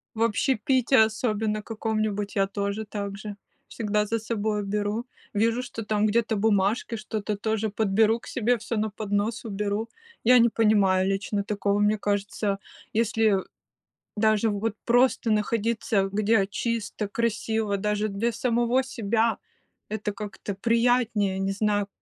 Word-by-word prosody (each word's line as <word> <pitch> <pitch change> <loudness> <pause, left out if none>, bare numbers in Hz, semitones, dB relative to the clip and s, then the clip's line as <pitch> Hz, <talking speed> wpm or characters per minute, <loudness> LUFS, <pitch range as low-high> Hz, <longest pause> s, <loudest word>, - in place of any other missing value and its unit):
В 225 - -1
общепите 255 +3 +2
особенно 215 -1 +1
каком-нибудь, 215 -2 -2
я 195 -1 +3
тоже 200 +2 -3
так 200 -1 -5
же, 210 0 -7 0.3
всегда 210 -1 -1
за 230 +2 0
собой 215 -1 -2
уберу. 210 +4 -2 0.3
Вижу, 230 +4 +1
что 225 -3 -6
там 210 0 +1
где-то 225 +1 +1
бумажки, 205 +2 +1
что-то 215 -1 -3
тоже 220 +1 -1
подберу 220 +2 +2
к - - -16
себе 245 0 +1
всё 230 +1 -4
на 215 0 0
поднос, 210 +2 -2
уберу. 210 +1 -2 0.4
Я 250 +2 +7
не 235 0 +6
понимаю 200 -4 +3
лично 200 +1 -1
такого, 205 -1 0
мне 210 +1 +2
кажется. 205 0 -1 0.4
Если 220 -1 +3 0.8
даже, 215 +1 +3
вот, 210 +1 -2
просто 245 -1 +3
находиться, 215 -2 +1
где 210 0 +2
чисто, 215 0 -3
красиво, 220 -1 -1
даже 210 +1 0
для 220 +4 -1
самого 240 +2 +1
себя, 230 -2 0 0.5
это 210 -1 -2
как-то 205 -1 -6
приятнее. 230 -3 +2
Не 195 0 0
знаю, 205 0 0
215 Hz, 135 wpm, -26 LUFS, 205-225 Hz, 0.8 s, Я